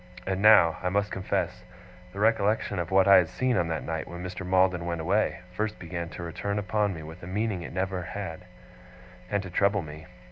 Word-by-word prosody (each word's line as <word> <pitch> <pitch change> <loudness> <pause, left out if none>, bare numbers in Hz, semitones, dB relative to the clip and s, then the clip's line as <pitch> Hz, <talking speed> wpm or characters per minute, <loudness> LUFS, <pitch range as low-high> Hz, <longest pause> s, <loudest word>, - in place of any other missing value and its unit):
And 95 0 -1
now, 95 -6 +7
I 90 - 0
must 100 +2 0
confess, 95 -1 -2 0.5
the 100 - -8
recollection 105 -2 +2
of 85 -1 -3
what 95 0 +4
I 100 - +9
had 85 -3 +3
seen 130 +5 0
on 85 - +1
that 80 -1 -3
night 80 -1 -4
when 85 +1 -7
Mr. 95 0 -6
Maldon 90 -1 +2
went 85 -1 -2
away, 95 +7 0
first 105 +3 -3
began 85 -1 -5
to 85 - -8
return 100 +4 -3
upon 105 -1 0
me 80 - -8
with 80 +3 -10
a 85 - -9
meaning 100 0 -1
it - - -6
had - - -9
never 95 0 -1
had, 90 -1 -6 0.8
and 100 -1 0
to 95 - -8
trouble 100 +1 +2
me. 75 +1 -10
95 Hz, 215 wpm, -27 LUFS, 85-100 Hz, 0.8 s, I